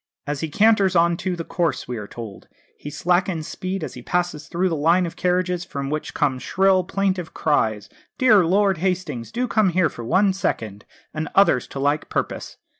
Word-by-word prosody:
"As 145 0 -3
he 160 - -3
canters 200 +1 +3
on 170 0 +4
to 185 0 -2
the 170 - -5
course," 170 -1 -2
we 125 - -4
are 105 -1 -6
told, 110 -4 -9 0.3
"he 145 - -8
slackens 175 0 0
speed 185 -1 -4
as - - -5
he 125 - -9
passes 175 +1 -2
through 180 +2 0
the 170 - -1
line 165 +5 +3
of 170 - -6
carriages, 180 -1 0
from 140 -5 -5
which 155 0 -4
come 140 -4 +1
shrill, 190 +5 +2
plaintive 185 -2 -2
cries, 110 -9 0 0.3
'Dear 220 -7 +5
Lord 190 +1 +2
Hastings, 175 -10 -2
do 245 +2 -1
come 215 -4 +2
here 175 -1 +2
for 120 - -9
one 190 - +2
second,' 110 - -3 0.3
and 155 -1 -3
others 195 -10 +4
to 135 - -7
like 145 +2 0
purpose. - - -3
175 Hz, 190 wpm, -22 LUFS, 145-185 Hz, 0.3 s, Dear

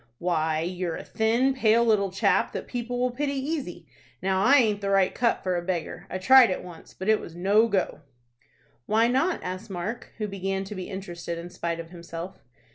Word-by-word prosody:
"Why 160 -2 0
you're 175 0 -3
a - - -7
thin, 235 +5 +1
pale 235 -2 +3
little 210 -3 +3
chap, 185 - +1
that - - -4
people 245 0 -4
will 250 0 +1
pity 280 +3 -2
easy. 275 - -4 0.3
Now 190 +1 +1
I 270 +5 +6
aint 215 -6 +3
the 200 - -2
right 195 -1 +3
cut 235 -1 +1
for 185 -1 0
a 175 - -1
beggar. 175 +1 -4
I 185 - -3
tried 250 +6 +7
it 185 - -3
once, 175 -2 -12
but 190 - -6
it 220 0 +4
was 165 - -10
no 200 +6 +3
go." 200 -4 -1 0.9
"Why 225 +2 +3
not?" 270 +9 +1
asked 185 +4 -5
Mark, 195 +6 -5
who 215 -2 -2
began 195 -1 -3
to 195 - -7
be 185 -1 -6
interested 175 -3 -6
in 170 +1 -8
spite 170 -1 -3
of 165 0 -8
himself. 170 +1 -8
195 Hz, 200 wpm, -26 LUFS, 180-230 Hz, 0.9 s, tried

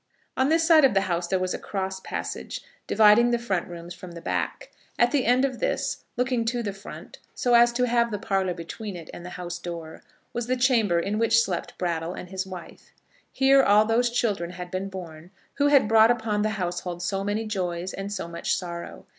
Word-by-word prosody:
On 260 +2 +2
this 325 +1 +3
side 320 -2 +6
of 260 -7 +4
the 195 - +4
house 175 -2 -1
there 190 - +1
was 185 0 -1
a - - -4
cross 190 -1 -4
passage, - - -5 0.3
dividing 220 +2 +6
the 240 - +2
front 200 -7 -2
rooms 175 0 -8
from 180 -2 -10
the 170 - -8
back. - - -3 0.3
At 240 0 +3
the 285 -4 +1
end 250 +2 +4
of 255 -3 -3
this, - - -1
looking 250 -1 +1
to 240 +1 -1
the 200 -2 -3
front 195 +1 -11 0.2
so 245 -4 +1
as 240 0 +7
to 250 +1 +1
have 235 -1 +2
the 210 - -3
parlour 195 -3 -1
between 190 +4 -7
it 165 -3 -9
and 175 - -9
the 180 - -7
house 175 -1 -5
door, 170 -2 -7 0.3
was 240 -1 -3
the 255 - +1
chamber 230 -9 +3
in 205 +5 -1
which 230 0 +4
slept 195 -6 -2
Brattle 170 -1 -2
and 180 - -8
his 190 0 -3
wife. 180 -2 -10 0.4
Here 270 0 +5
all 210 -3 +5
those 235 +2 +2
children 210 -8 -1
had 180 0 -8
been 190 +1 -3
born 170 -3 -9 0.3
who 285 0 +3
had 280 -6 +5
brought 220 +1 +6
upon 220 -3 +1
the 215 - +1
household 175 -1 -3
so 195 +2 -1
many 205 +2 -1
joys 180 -3 -3
and 195 +1 -5
so 190 -4 -4
much 170 0 -1
sorrow. 170 -2 -7
200 Hz, 215 wpm, -25 LUFS, 180-235 Hz, 0.4 s, as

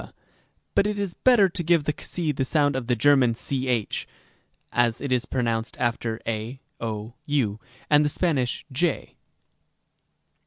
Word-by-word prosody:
3 - - -10
and - - -18
x, - - -30 0.6
but 200 - +3
it 210 0 -2
is 200 -3 -2
better 240 -4 +5
to 180 0 -3
give 165 -3 +2
x 150 - -4
the 165 -4 0
sound 145 0 +2
of 130 -3 -3
the 125 - +2
German 125 -1 +4
ch 125 -3 -2 0.7
(as 120 -1 +2
it 140 - -4
is 125 -1 +1
pronounced 115 -3 -1
after 120 -2 -1
a, 115 +3 -3 0.2
0, 110 0 -4
w) 120 -8 0 0.3
and 150 0 +5
the 150 - +2
Spanish 145 -7 -1
ἡ. 160 +3 0
130 Hz, 160 wpm, -25 LUFS, 115-150 Hz, 0.7 s, better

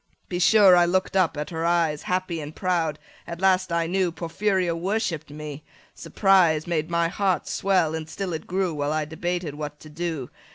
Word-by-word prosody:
30 - - -41
Be 175 - -2
sure 195 0 +7
I 175 0 +5
look'd 185 +2 0
up 180 -5 +2
at 150 +4 -4
her 165 -1 -3
eyes 165 -3 +1
Happy 180 -3 -2
and 150 +1 -8
proud; 170 -5 0 0.3
at 170 0 -6
last 185 -1 +2
I 170 0 +1
knew 180 +1 0
Porphyria 175 +1 -1
worshipp'd 185 -3 -2
me; 150 0 -8 0.3
surprise 180 -6 +3
Made 165 -2 -1
my 170 0 +1
heart 190 +1 0
swell, 185 -5 +1
and 160 -1 -5
still 190 -1 -4
it 160 - -6
grew 185 -1 -1
While 145 0 -1
I 155 -1 -1
debated 175 0 -3
what 150 0 -6
to 155 - -12
do. 160 -5 -4
170 Hz, 195 wpm, -24 LUFS, 155-185 Hz, 0.3 s, sure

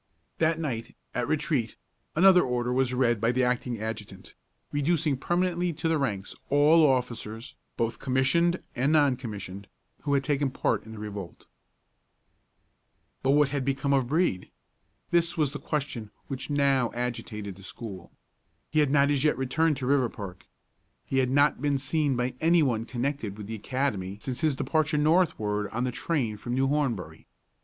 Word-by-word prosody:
That 160 0 +2
night, 120 -7 -4 0.2
at 120 -1 -1
retreat, 145 -7 0 0.4
another 180 +2 +7
order 125 -2 -1
was 130 -1 +2
read 120 -4 +1
by 115 +1 +3
the 130 +1 +1
acting 125 -1 -1
adjutant, 105 -3 -6 0.4
reducing 150 0 +1
permanently 175 +4 0
to 160 +2 -2
the 160 -1 +2
ranks 100 -8 -2
all 150 +3 +5
officers, 120 -3 -2 0.2
both 115 0 -1
commissioned 170 +7 +2
and 135 +4 +1
non 145 -4 +4
commissioned, 100 -5 -7 0.3
who 145 -1 +1
had 140 - +1
taken 140 0 +1
part 125 - -1
in 110 - -9
the - - -9
revolt. 105 -4 -7 1.8
But 135 - +3
what 150 -2 +4
had 140 -1 -1
become 135 +1 0
of 135 -3 +2
Brede? 150 - 0 0.6
This 170 -1 +2
was 150 -4 +2
the 145 - -6
question 135 -8 -3 0.2
which 135 0 -6
now 140 -4 +2
agitated 115 -4 -4
the 95 - -15
school. 95 -3 -8 0.6
He 155 - +2
had 150 -2 +3
not 140 0 +4
as 140 -1 +1
yet 150 - +3
returned 150 +4 +1
to 130 - -4
Riverpark. 110 -9 -1 0.6
He 135 - 0
had 130 -1 +2
not 145 0 +3
been 145 -1 +1
seen 140 +1 0
by 125 +1 -1
any 165 0 +5
one 115 -5 0
connected 120 -4 -3
with 105 - -7
the 110 - -6
academy 105 -5 -2
since 125 +3 -4
his 155 -3 +2
departure 150 +3 +1
northward 145 - +2
on 120 +2 -2
the 125 - 0
train 125 -5 -1
from 120 +3 -4
New 135 +1 +2
Hornbury. 135 -8 -2
130 Hz, 165 wpm, -27 LUFS, 115-150 Hz, 1.8 s, another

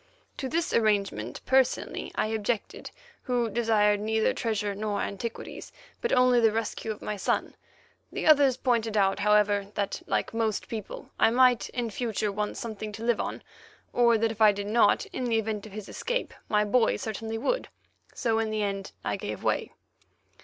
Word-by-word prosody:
To 265 - -3
this 335 +3 -1
arrangement 200 - 0
personally 260 0 +1
I - - +1
objected, 220 0 -2 0.3
who 245 -3 0
desired 210 -2 +3
neither 220 +1 +1
treasure 210 -3 -1
nor 205 0 -2
antiquities, 225 +3 -5 0.3
but 470 - -1
only 250 -1 +5
the 225 -2 +4
rescue 225 0 -3
of 215 - -5
my 210 - -3
son. 190 - -1 0.6
The - - -4
others 285 -4 +6
pointed 230 -4 0
out, 195 0 +2
however, 205 -1 +3
that, 200 -2 -2
like - - -1
most 225 -2 -1
people, 220 -3 -7
I - - +6
might 250 0 +4
in 240 -3 -3
future 215 -2 -1
want 210 +1 -3
something 215 -2 -5
to 220 +2 -7
live 235 -1 +2
on, - - -5 0.5
or 235 -1 +4
that 225 0 +1
if 225 0 -9
I 215 -1 +8
did 200 0 -5
not, 230 - +3
in 255 - -2
the 230 -2 +2
event 220 -1 -2
of - - -13
his 210 -1 -7
escape, - - -3 0.2
my 210 -1 +3
boy 225 +2 +3
certainly 225 -1 -4
would; - - -1 0.4
so 225 -3 0
in 225 -1 0
the 215 -1 -1
end 195 -1 -3
I - - -1
gave - - -6
way. - - 0
220 Hz, 175 wpm, -28 LUFS, 210-235 Hz, 0.6 s, I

